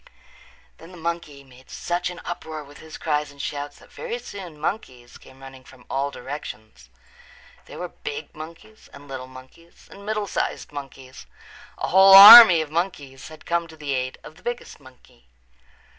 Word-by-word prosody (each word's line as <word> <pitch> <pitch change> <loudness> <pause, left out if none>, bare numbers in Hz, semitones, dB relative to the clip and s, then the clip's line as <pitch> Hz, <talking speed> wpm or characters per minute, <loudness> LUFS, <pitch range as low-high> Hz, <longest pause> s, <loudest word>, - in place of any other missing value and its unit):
Then 165 - -14
the 180 - -14
monkey 165 -4 -6
made 130 -1 -20
such 175 +1 -4
an 180 - -10
uproar 160 -3 -7
with 145 0 -16
his 160 0 -12
cries 150 -2 -2
and 140 0 -18
shouts 145 0 -6
that - - -20
very 480 0 -6
soon 185 - -11
monkeys 130 - -6
came 130 0 -19
running 135 -1 -13
from 125 -1 -19
all 140 +1 -2
directions. 125 -6 -10 0.8
There - - -12
were - - -6
big 450 0 -9
monkeys 165 +7 -13
and 145 0 -14
little 130 -2 -8
monkeys 130 +6 -17
and 200 - -14
middle 210 0 -3
sized - - -4
monkeys. 135 - -11 0.5
A - - -4
whole 190 +1 +7
army 200 -3 +11
of 155 -2 -7
monkeys 150 -6 -5
had 155 0 -15
come 170 0 -2
to 160 -1 -16
the 145 -2 -5
aid 130 0 -4
of 155 - -14
the - - -19
biggest 240 0 -7
monkey. 130 - -21
150 Hz, 175 wpm, -22 LUFS, 135-175 Hz, 0.8 s, army